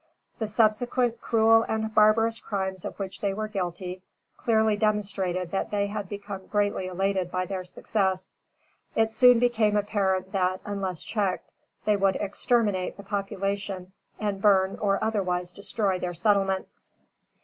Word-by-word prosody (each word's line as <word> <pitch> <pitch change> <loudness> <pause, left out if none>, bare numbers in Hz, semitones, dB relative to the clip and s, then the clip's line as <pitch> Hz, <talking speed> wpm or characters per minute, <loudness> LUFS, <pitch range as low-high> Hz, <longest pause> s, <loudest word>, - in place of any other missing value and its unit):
The 220 - -1
subsequent 230 +2 +1
cruel 225 0 +5
and 220 0 -1
barbarous 225 +2 +4
crimes 190 -2 -3
of - - -6
which 190 -2 -5
they 195 -1 0
were 215 +1 -2
guilty, 185 -2 -4 0.3
clearly 220 -2 +2
demonstrated 195 -4 -1
that 195 - -1
they 205 -1 0
had 200 -2 -5
become 200 -2 -7
greatly 205 -2 0
elated 190 0 -1
by 185 0 -1
their 190 -1 -4
success. 190 0 -2 0.6
It 225 0 +2
soon 250 0 +7
became 225 -3 +2
apparent 190 -2 0
that, 185 -1 0
unless 195 -5 -3
checked, 200 -4 -2 0.3
they 210 -1 +3
would 195 -1 +2
exterminate 205 -2 0
the 200 - -9
population 195 -2 -3 0.3
and 205 -2 -2
burn 195 -2 +4
or 200 -1 +1
otherwise 180 -5 -1
destroy 200 -2 -1
their 175 -1 -3
settlements. 195 +1 0
200 Hz, 140 wpm, -27 LUFS, 190-215 Hz, 0.6 s, soon